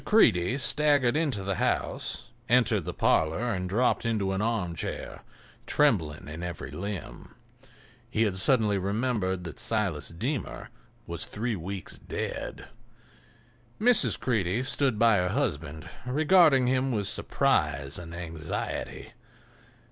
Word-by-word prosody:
Creede 125 - +4
staggered 145 -1 +3
into 145 -11 0
the 95 -1 -2
house, 120 - -1 0.2
entered 115 -7 +3
the - - -3
parlor 105 +10 +2
and 90 -1 -3
dropped 120 +6 +2
into 110 -4 0
an 95 +1 -1
armchair, 100 -8 -3 0.5
trembling 90 - +1
in 80 +2 -7
every 85 -5 -5
limb. 95 +4 -6 0.7
He 115 -1 +1
had 100 -4 0
suddenly 105 -2 +3
remembered 100 -2 -1
that 85 -5 -8
Silas 95 -10 -1
Deemer 120 - -4 0.3
was 85 -1 -4
three 115 +2 -3
weeks 95 +1 -6
dead. - - -5 1.1
Mrs. 220 - +4
Creede 115 -1 0
stood 135 -4 +1
by 115 -1 +5
her 90 0 +1
husband, 80 - -2 0.2
regarding 150 -1 +5
him 130 +1 +1
with 105 -4 -1
surprise 70 -5 0
and 85 -1 -8
anxiety. 80 -3 -5
105 Hz, 120 wpm, -28 LUFS, 90-125 Hz, 1.1 s, by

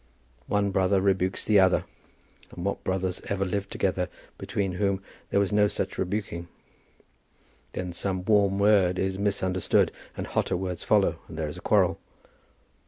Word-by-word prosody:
One 100 -1 +1
brother 95 +1 +3
rebukes 95 -1 +1
the 105 -2 +5
other, 95 -1 +4 0.6
and 85 - -7
what 100 - -2
brothers 95 -1 -1
ever 100 -1 0
lived 100 +2 -2
together 90 -1 -1 0.3
between 100 -2 -2
whom 100 +1 0 0.3
there - - +2
was 100 0 +1
no 105 0 +5
such - - -3
rebuking? 90 -3 -3 1.3
then 90 -1 -4
some 95 0 -2
warm 100 -2 +3
word 100 -3 +4
is 95 0 -1
misunderstood 95 -3 +1 0.3
and - - -3
hotter - - 0
words 90 -2 -4
follow - - +2
and 80 - -9
there 80 -2 -2
is 75 - -8
a - - -13
quarrel. - - +3
95 Hz, 155 wpm, -27 LUFS, 90-100 Hz, 1.3 s, the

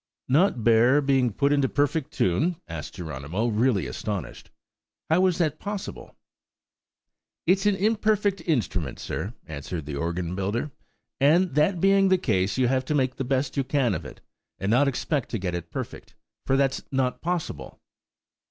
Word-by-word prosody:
"Not 140 - +3
bear 120 +5 +5
being 135 -4 +2
put 140 +7 +1
into 140 -2 +2
perfect 145 +1 0
tune?" 150 - +1
asked 80 +2 -7
Geronimo, 85 - -3
really 110 - +2
astonished. 95 - -5 0.6
"How 175 +3 +4
is 180 -2 0
that 155 -4 0
possible?" 205 -1 -6 1.3
"It's 190 +4 +3
an 205 - +3
imperfect 210 -1 +1
instrument, 100 - -1
sir," 100 +9 -5
answered 80 +1 -6
the 75 -1 -5
organ 85 +3 -2
builder: 100 +9 -2 0.5
"and 160 +4 +4
that 155 +6 +2
being 195 +1 +4
the 185 - +5
case, 100 - 0
you 130 -1 +3
have 130 +1 +1
to 150 - -1
make 130 -2 0
the - - -2
best 135 +2 -1
you 135 - +2
can 130 -4 +1
of - - -3
it, - - -11 0.4
and 95 +3 -1
not 135 +5 +4
expect 140 +1 -1
to 115 - -2
get 90 -3 -3
it 85 -1 -5
perfect, - - -7 0.3
for 135 - +3
that's 135 -1 +1
not 130 -2 0
possible." 175 -1 -4
130 Hz, 160 wpm, -26 LUFS, 100-160 Hz, 1.3 s, bear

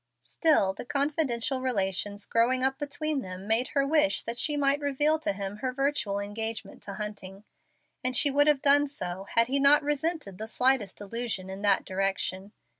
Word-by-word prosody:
Still 195 - +2
the - - -8
confidential 275 -2 -1
relations 205 -4 -1
growing 250 +3 +1
up 270 +1 0
between 290 0 -2
them 185 -1 -8
made 225 +3 +2
her 275 -1 +3
wish 275 -10 +2
that 235 +1 -4
she 295 -1 +1
might 280 0 +2
reveal 295 +2 +1
to 315 - -1
him 200 +1 -5
her 255 +4 -3
virtual 255 -6 -1
engagement 220 +2 -6
to 200 - -8
Hunting; 205 -2 -7 0.6
and 255 0 -1
she 290 - +6
would 290 +2 +3
have 295 -3 +2
done 290 +1 +5
so, 190 -8 -6
had 230 - +5
he 270 +4 0
not 290 +2 +5
resented 295 - -2
the 220 - -5
slightest 250 -4 +1
allusion 205 -3 -4
in 190 +1 -7
that 205 -2 +2
direction. 195 0 -2
245 Hz, 180 wpm, -28 LUFS, 200-285 Hz, 0.6 s, she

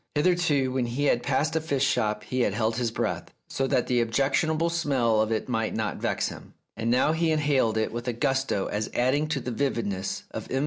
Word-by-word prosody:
Hitherto, 150 -5 +2
when 130 -2 0
he 125 +5 -2
had 120 -4 +3
passed 145 +5 0
a 160 - +1
fish 140 -4 0
shop 105 -6 0
he 130 - -3
had 105 -5 +1
held 115 0 0
his 120 -2 0
breath, - - -2 0.2
so 135 - -1
that 125 - +1
the 125 -1 +2
objectionable 145 +7 +1
smell 130 -10 +2
of 110 +1 0
it 110 - -1
might 115 -3 -1
not 110 -2 -2
vex - - -1
him; - - -11 0.2
now, 120 +6 +2
he 165 +1 +1
inhaled 145 -8 +2
it 110 - 0
with 120 +1 -5
a 125 - 0
gusto 135 -4 0
as 105 +1 -2
adding 135 +5 +2
to 155 -3 -1
the 125 - -4
vividness 110 -7 -2
of - - -6
M. 130 - 0
130 Hz, 215 wpm, -26 LUFS, 115-145 Hz, 0.2 s, had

